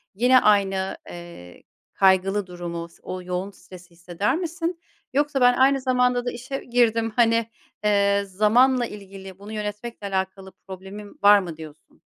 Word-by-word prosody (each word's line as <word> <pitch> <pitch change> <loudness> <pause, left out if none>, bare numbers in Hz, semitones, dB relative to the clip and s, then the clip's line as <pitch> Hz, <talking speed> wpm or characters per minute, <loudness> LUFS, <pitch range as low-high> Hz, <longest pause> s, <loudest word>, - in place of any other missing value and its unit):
yine 250 +4 +5
aynı, 195 -3 +1
eee, 170 - -11 0.3
kaygılı 190 +1 +2
durumu 170 -1 -6
s - - -23
o 185 0 -6
yoğun 180 +2 -4
stresi 180 -1 -15
hisseder 175 - -2
misin 340 0 -4 0.3
yoksa 285 -1 0
ben 245 0 +6
aynı 270 +1 +3
zamanda 250 -1 +1
da 245 - -1
işe 255 +3 -6
girdim 230 -2 +1
hani, 230 -1 +2 0.3
eee, 200 -1 +2
zamanla 240 +6 +3
ilgili 195 -3 -11
bunu 205 +2 -10
yönetmekle 210 +1 -5
alakalı 190 0 -4 0.2
problemim 195 +2 -10
var 205 0 +8
mı 170 -5 -7
diyorsun? 155 -2 -13
205 Hz, 145 wpm, -23 LUFS, 190-245 Hz, 0.3 s, var